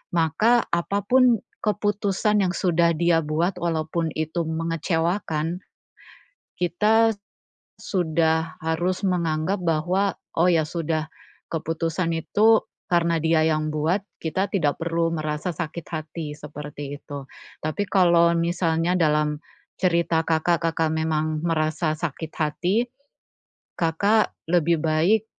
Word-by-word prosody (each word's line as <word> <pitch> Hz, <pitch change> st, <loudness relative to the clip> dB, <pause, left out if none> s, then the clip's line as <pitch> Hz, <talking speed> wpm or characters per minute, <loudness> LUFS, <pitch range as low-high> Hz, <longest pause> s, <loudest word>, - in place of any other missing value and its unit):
maka 195 Hz, +9 st, +3 dB
apa 190 Hz, +4 st, 0 dB
pun 250 Hz, -2 st, +4 dB, 0.2 s
keputusan 210 Hz, 0 st, +1 dB
yang 180 Hz, -1 st, +1 dB
sudah 170 Hz, -2 st, +2 dB
dia 170 Hz, -1 st, +3 dB
buat 170 Hz, +5 st, -1 dB
walaupun 165 Hz, 0 st, -1 dB
itu 160 Hz, +2 st, -1 dB
mengecewakan, 165 Hz, +1 st, -1 dB, 1.0 s
kita 220 Hz, +6 st, +3 dB
s 200 Hz, -, -25 dB, 0.6 s
sudah 160 Hz, -3 st, 0 dB
harus 175 Hz, +4 st, -1 dB
menganggap 170 Hz, 0 st, 0 dB
bahwa, 175 Hz, +5 st, +1 dB, 0.2 s
oh 170 Hz, -, +5 dB
ya 165 Hz, -3 st, +4 dB
sudah, 160 Hz, -1 st, -2 dB, 0.4 s
keputusan 165 Hz, +1 st, -1 dB
itu 210 Hz, +7 st, +3 dB, 0.3 s
karena 170 Hz, -2 st, +2 dB
dia 160 Hz, 0 st, +3 dB
yang 155 Hz, -1 st, +1 dB
buat, 160 Hz, +6 st, +1 dB, 0.2 s
kita 185 Hz, +5 st, -1 dB
tidak 150 Hz, -6 st, +1 dB
perlu 165 Hz, 0 st, 0 dB
merasa 155 Hz, +1 st, -2 dB
sakit 165 Hz, 0 st, -5 dB
hati, 155 Hz, 0 st, -5 dB
seperti 145 Hz, -1 st, -7 dB
itu. 140 Hz, -2 st, -8 dB, 0.3 s
Tapi 155 Hz, +7 st, -2 dB
kalau 170 Hz, -3 st, +5 dB
misalnya 170 Hz, 0 st, +1 dB
dalam, 150 Hz, -2 st, +2 dB, 0.4 s
cerita 170 Hz, -3 st, +2 dB
Kakak, 165 Hz, +1 st, +1 dB
Kakak 165 Hz, -1 st, 0 dB
memang 155 Hz, -1 st, -1 dB
merasa 155 Hz, -1 st, 0 dB
sakit 160 Hz, 0 st, -5 dB
hati, 175 Hz, +9 st, 0 dB, 0.9 s
Kakak 200 Hz, +6 st, +2 dB, 0.2 s
lebih 170 Hz, -1 st, +3 dB
baik 165 Hz, +8 st, +2 dB
165 Hz, 115 wpm, -24 LUFS, 155-180 Hz, 1.0 s, oh